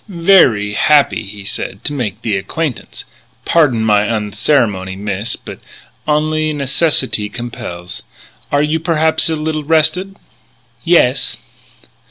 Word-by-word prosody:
"Veree 165 Hz, -, +4 dB
happee," 140 Hz, -4 st, +3 dB
he 100 Hz, 0 st, -9 dB
said, 100 Hz, 0 st, -5 dB
"to 145 Hz, -, -2 dB
make 115 Hz, -5 st, -4 dB
the 110 Hz, -3 st, 0 dB
acquaintance. 140 Hz, +8 st, -4 dB, 0.4 s
Pardon 135 Hz, -9 st, +3 dB
my 105 Hz, -2 st, +3 dB
unceremony, 105 Hz, -2 st, 0 dB
miss, 100 Hz, +3 st, -3 dB
but -, -, -10 dB, 0.5 s
onlee 155 Hz, +1 st, +1 dB
necissitee 140 Hz, -6 st, 0 dB
compels. 90 Hz, -8 st, -7 dB, 0.5 s
Are 145 Hz, 0 st, +2 dB
you, 155 Hz, +2 st, 0 dB
perhaps, 160 Hz, 0 st, +1 dB
a 160 Hz, -, 0 dB
little 155 Hz, 0 st, -3 dB
rested?" 165 Hz, +5 st, +1 dB, 0.7 s
"Yes." 135 Hz, -6 st, +2 dB
135 Hz, 115 wpm, -16 LUFS, 105-155 Hz, 0.7 s, Veree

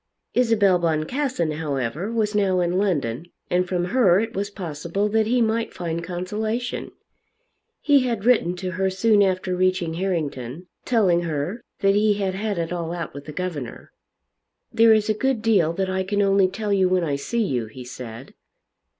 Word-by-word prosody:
Isabel 210 Hz, -7 st, +3 dB
Boncassen, 170 Hz, -, -1 dB
however, 150 Hz, -, -2 dB
was 220 Hz, -2 st, 0 dB
now 195 Hz, -3 st, +2 dB
in 175 Hz, +1 st, +1 dB
London, 155 Hz, -, -1 dB, 0.2 s
and 180 Hz, +1 st, +2 dB
from 175 Hz, -1 st, -1 dB
her 195 Hz, -8 st, +5 dB
it 225 Hz, +2 st, -2 dB
was 200 Hz, -1 st, -2 dB
possible 175 Hz, +1 st, -3 dB
that 220 Hz, 0 st, +2 dB
he 245 Hz, +1 st, +3 dB
might 225 Hz, +1 st, -1 dB
find 170 Hz, -1 st, -3 dB
consolation. 215 Hz, +7 st, -3 dB, 0.9 s
He 290 Hz, -2 st, +5 dB
had 230 Hz, -4 st, -2 dB
written 215 Hz, -8 st, +3 dB
to 185 Hz, 0 st, -4 dB
her 190 Hz, +1 st, 0 dB
soon 205 Hz, +2 st, +3 dB
after 185 Hz, -1 st, +1 dB
reaching 185 Hz, -2 st, +1 dB
Harrington, 165 Hz, -5 st, -3 dB, 0.2 s
telling 195 Hz, -8 st, +3 dB
her 165 Hz, +7 st, -3 dB, 0.2 s
that 195 Hz, 0 st, +4 dB
he 210 Hz, 0 st, +3 dB
had 195 Hz, -2 st, -1 dB
had 205 Hz, 0 st, -2 dB
it 170 Hz, +1 st, -2 dB
all 170 Hz, -1 st, -3 dB
out 170 Hz, -2 st, -5 dB
with 140 Hz, 0 st, -9 dB
the 155 Hz, -, -7 dB
governor. 150 Hz, -7 st, -5 dB, 0.8 s
"There 225 Hz, 0 st, +6 dB
is 215 Hz, -1 st, +4 dB
a 215 Hz, -, +2 dB
good 240 Hz, +1 st, -1 dB
deal 195 Hz, -8 st, +3 dB
that 190 Hz, +2 st, -1 dB
I 190 Hz, 0 st, -1 dB
can 205 Hz, +2 st, 0 dB
only 195 Hz, -1 st, +4 dB
tell 205 Hz, +2 st, -2 dB
you 190 Hz, -2 st, +3 dB
when 185 Hz, -1 st, +2 dB
I 145 Hz, -4 st, 0 dB
see 230 Hz, +12 st, -1 dB
you," 125 Hz, -, -2 dB
he 125 Hz, +4 st, -10 dB
said. 125 Hz, 0 st, -9 dB
185 Hz, 175 wpm, -23 LUFS, 170-210 Hz, 0.9 s, There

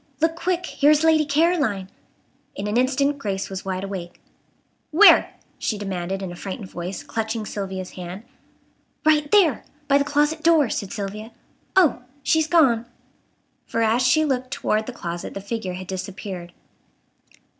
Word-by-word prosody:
Look 325 Hz, +1 st, +2 dB
quick! 360 Hz, +1 st, -1 dB
here 290 Hz, -, +2 dB
is 305 Hz, +1 st, +4 dB
Lady 320 Hz, -1 st, +4 dB
Caroline!" 285 Hz, -, +1 dB, 0.7 s
In 200 Hz, -, -4 dB
an 210 Hz, +1 st, -2 dB
instant 275 Hz, +3 st, +1 dB
Grace 195 Hz, -5 st, -3 dB
was 190 Hz, 0 st, -5 dB
wide 190 Hz, 0 st, -3 dB
awake. 190 Hz, -3 st, -6 dB, 0.7 s
"Where?" 320 Hz, -, +6 dB, 0.2 s
she 215 Hz, -, -1 dB
demanded, 195 Hz, -1 st, -4 dB
in 185 Hz, -, -5 dB
a -, -, -8 dB
frightened 190 Hz, +1 st, -7 dB
voice, 175 Hz, +2 st, -5 dB
clutching 220 Hz, 0 st, -3 dB
Sylvia's 190 Hz, -3 st, -5 dB
hand. 180 Hz, +3 st, -8 dB, 0.8 s
"Right 300 Hz, -1 st, +3 dB
there! 340 Hz, -, +4 dB, 0.2 s
By 280 Hz, 0 st, +4 dB
the -, -, +2 dB
closet 295 Hz, +2 st, +1 dB
door," 310 Hz, -6 st, +4 dB
said 200 Hz, -, -3 dB
Sylvia. 215 Hz, +1 st, -5 dB, 0.4 s
"Oh! 335 Hz, -10 st, +4 dB, 0.2 s
she's 315 Hz, 0 st, +2 dB
gone!" 255 Hz, -9 st, +3 dB, 0.8 s
For 230 Hz, -, 0 dB
as 225 Hz, +3 st, +2 dB
she 260 Hz, +5 st, +4 dB
looked 260 Hz, -3 st, -1 dB
toward 215 Hz, -3 st, -1 dB
the -, -, -4 dB
closet 175 Hz, -7 st, -6 dB
the -, -, -3 dB
figure 200 Hz, -2 st, -4 dB
had 185 Hz, +1 st, -7 dB
disappeared. 185 Hz, -1 st, -6 dB
225 Hz, 155 wpm, -23 LUFS, 195-295 Hz, 0.8 s, Where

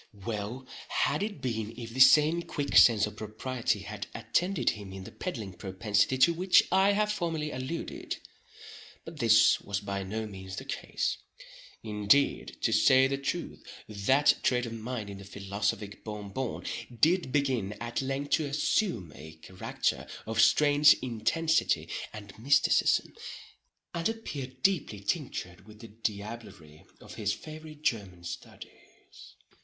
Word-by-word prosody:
Well 115 Hz, +3 st, -4 dB, 0.2 s
had 150 Hz, -, +1 dB
it 205 Hz, 0 st, -4 dB
been 115 Hz, -3 st, -3 dB
if 115 Hz, -2 st, -7 dB
the 130 Hz, -, -5 dB
same 150 Hz, +5 st, +7 dB
quick 145 Hz, -4 st, -4 dB
sense 110 Hz, -3 st, +7 dB
of 105 Hz, -, -8 dB
propriety 110 Hz, 0 st, -2 dB
had 105 Hz, +1 st, -7 dB
attended 180 Hz, +1 st, 0 dB
him 100 Hz, -3 st, -9 dB
in 95 Hz, 0 st, -7 dB
the -, -, -10 dB
peddling 110 Hz, -, -5 dB
propensity 100 Hz, +6 st, 0 dB
to 170 Hz, +6 st, +5 dB
which 180 Hz, +2 st, +5 dB
I 190 Hz, +2 st, +4 dB
have 210 Hz, +1 st, +1 dB
formerly 165 Hz, -6 st, -2 dB
alluded—but 150 Hz, +3 st, -8 dB
this 115 Hz, -1 st, +5 dB
was 100 Hz, -1 st, -2 dB
by 100 Hz, -1 st, -4 dB
no 110 Hz, +4 st, -4 dB
means 95 Hz, -2 st, -8 dB
the -, -, -7 dB
case. -, -, -2 dB, 0.7 s
Indeed 105 Hz, +5 st, +1 dB
to 115 Hz, -, +1 dB
say 130 Hz, +4 st, +6 dB
the 135 Hz, +1 st, -1 dB
truth, 170 Hz, +5 st, -4 dB, 0.2 s
that 110 Hz, +8 st, +3 dB
trait 125 Hz, -1 st, +1 dB
of 115 Hz, -, -6 dB
mind 115 Hz, -1 st, -5 dB
in 100 Hz, -, -9 dB
the -, -, -10 dB
philosophic 100 Hz, +1 st, -3 dB
Bon 105 Hz, -2 st, -6 dB
Bon 130 Hz, +3 st, -4 dB, 0.3 s
did 170 Hz, -3 st, +3 dB
begin 130 Hz, -8 st, 0 dB
at 120 Hz, +3 st, -4 dB
length 135 Hz, +2 st, -3 dB
to 155 Hz, -, +3 dB
assume 140 Hz, -, 0 dB
a 80 Hz, +1 st, -11 dB
character 90 Hz, +4 st, -3 dB, 0.2 s
of 110 Hz, +1 st, +1 dB
strange 145 Hz, +4 st, +6 dB
intensity 130 Hz, +8 st, +1 dB, 0.2 s
and 100 Hz, -2 st, -10 dB
mysticism, 140 Hz, +5 st, +3 dB, 0.8 s
and 170 Hz, +3 st, 0 dB
appeared 135 Hz, -, -6 dB
deeply 170 Hz, -, +1 dB
tinctured 100 Hz, -, -4 dB
with 105 Hz, 0 st, -13 dB
the 115 Hz, -1 st, -11 dB
diablerie 100 Hz, -7 st, -7 dB
of -, -, -12 dB
his 105 Hz, -1 st, -1 dB
favorite 155 Hz, -1 st, -10 dB
German 95 Hz, -, -2 dB
studies. 85 Hz, 0 st, -12 dB
115 Hz, 140 wpm, -29 LUFS, 105-145 Hz, 0.8 s, same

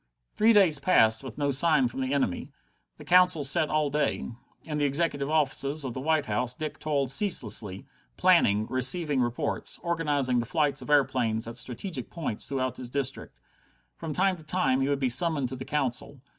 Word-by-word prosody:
Three 220 Hz, +2 st, +4 dB
days 190 Hz, -9 st, +5 dB
passed 110 Hz, -9 st, +3 dB
with 130 Hz, -4 st, -9 dB
no 145 Hz, -1 st, 0 dB
sign 140 Hz, -1 st, +3 dB
from 120 Hz, +3 st, -6 dB
the 130 Hz, 0 st, -2 dB
enemy. 135 Hz, -11 st, -1 dB, 0.5 s
The -, -, -12 dB
Council 180 Hz, -3 st, +4 dB
sat 140 Hz, +3 st, +1 dB
all 150 Hz, -2 st, 0 dB
day. 145 Hz, -4 st, -1 dB, 0.3 s
In 150 Hz, -2 st, -5 dB
the -, -, 0 dB
executive 145 Hz, -1 st, -1 dB
offices 145 Hz, -1 st, 0 dB
of 125 Hz, -, -4 dB
the 130 Hz, -, -5 dB
White 155 Hz, 0 st, +1 dB
House 120 Hz, +3 st, -2 dB
Dick 155 Hz, +1 st, -6 dB
toiled 140 Hz, -4 st, -1 dB
ceaselessly, 110 Hz, -, 0 dB, 0.3 s
planning, 105 Hz, +2 st, +3 dB
receiving 130 Hz, +3 st, +1 dB
reports, 125 Hz, +5 st, -2 dB
organizing 145 Hz, -7 st, 0 dB
the 120 Hz, -, -3 dB
flights 145 Hz, -1 st, 0 dB
of -, -, -10 dB
airplanes 125 Hz, -6 st, +1 dB
at 115 Hz, -, -7 dB
strategic 130 Hz, -, -3 dB
points 155 Hz, -11 st, -3 dB
throughout 130 Hz, -2 st, -3 dB
his 125 Hz, -2 st, -6 dB
district. 135 Hz, +1 st, -4 dB, 0.6 s
From 165 Hz, -2 st, -6 dB
time 185 Hz, +3 st, +1 dB
to 160 Hz, -, -15 dB
time 155 Hz, -5 st, 0 dB
he 135 Hz, -, 0 dB
would 140 Hz, -, +1 dB
be 135 Hz, -1 st, 0 dB
summoned 140 Hz, +1 st, +1 dB
to 130 Hz, -, -5 dB
the 130 Hz, +1 st, -8 dB
Council. 140 Hz, -1 st, -3 dB
140 Hz, 185 wpm, -27 LUFS, 125-155 Hz, 0.6 s, days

